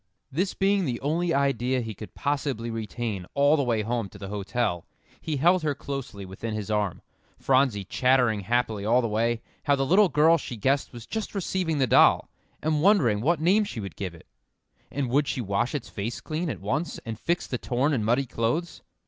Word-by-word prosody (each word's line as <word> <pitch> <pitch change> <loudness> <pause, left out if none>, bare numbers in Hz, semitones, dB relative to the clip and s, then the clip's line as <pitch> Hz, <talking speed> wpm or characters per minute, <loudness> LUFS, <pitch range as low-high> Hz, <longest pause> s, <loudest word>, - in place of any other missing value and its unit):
This 185 +8 -1
being 195 -1 +2
the 120 -4 -2
only 165 +5 0
idea 130 -3 +1
he 110 -2 -5
could 105 +1 -11
possibly 140 -5 -2
retain 110 -4 -4
all 145 +2 +5
the 150 - +1
way 115 -5 0
home 115 -2 -2
to 100 - -13
the 100 -1 -7
hotel, 100 -3 -2 0.3
he 155 -3 -2
held 175 +6 +4
her 150 -2 0
closely 135 -9 -6
within 105 +4 -5
his 110 0 -4
arm, 105 -3 -1 0.3
Phronsie 130 -6 +2
chattering 125 +1 +2
happily 110 0 0
all 120 +4 +3
the - - +1
way, 115 +2 0 0.2
how 145 -2 +4
the 135 0 0
little 190 +6 +5
girl 160 +3 +4
she 125 - -6
guessed 135 +6 +1
was 120 -3 -10
just 220 -1 -4
receiving 185 -4 -1
the 135 - +3
doll, - - +5 0.3
and 155 -1 +1
wondering 150 - +4
what 165 +5 +2
name 190 +7 +4
she 200 - -5
would 100 -2 -6
give 95 -4 -5
it, 80 - -16 0.6
and 140 -2 -2
would 140 +2 +2
she - - -2
wash 105 +5 -1
its 145 - -4
face 110 +3 -4
clean 160 +2 -3
at - - -5
once, 150 +6 -2
and 115 -2 -5
fix 170 +7 -1
the 125 - -4
torn 130 +5 0
and 115 -6 0
muddy 120 +5 +2
clothes? 125 +9 -2
130 Hz, 200 wpm, -26 LUFS, 110-150 Hz, 0.6 s, all